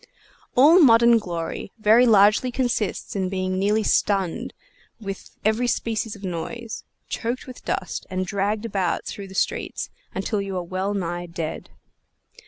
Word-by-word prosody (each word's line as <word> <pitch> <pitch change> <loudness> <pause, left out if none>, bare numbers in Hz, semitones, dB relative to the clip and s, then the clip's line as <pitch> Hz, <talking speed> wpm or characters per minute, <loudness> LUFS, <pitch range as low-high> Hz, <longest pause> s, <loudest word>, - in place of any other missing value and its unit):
All 300 +8 +7
modern 235 -5 +6
glory 175 -1 -5
very 225 +3 +5
largely 215 +3 +5
consists 240 -7 -1
in 190 -2 -1
being 185 0 -1
nearly 210 +3 +2
stunned 195 -4 +1 0.5
with 195 -3 -7 0.2
every 220 +3 +2
species 225 -2 -1
of 205 - -14
noise, 205 +6 -5 0.2
choked 240 +2 -3
with 255 -1 -11
dust, - - -3
and 185 0 -2
dragged 205 +3 -1
about 195 -5 -1
through 200 -1 -6
the 190 - -12
streets, - - -2 0.2
until 200 +2 -1
you 195 -1 -4
are 180 - -2
well 190 +3 -2
nigh 175 -2 -3
dead. 165 -2 -5
205 Hz, 145 wpm, -24 LUFS, 185-230 Hz, 0.5 s, All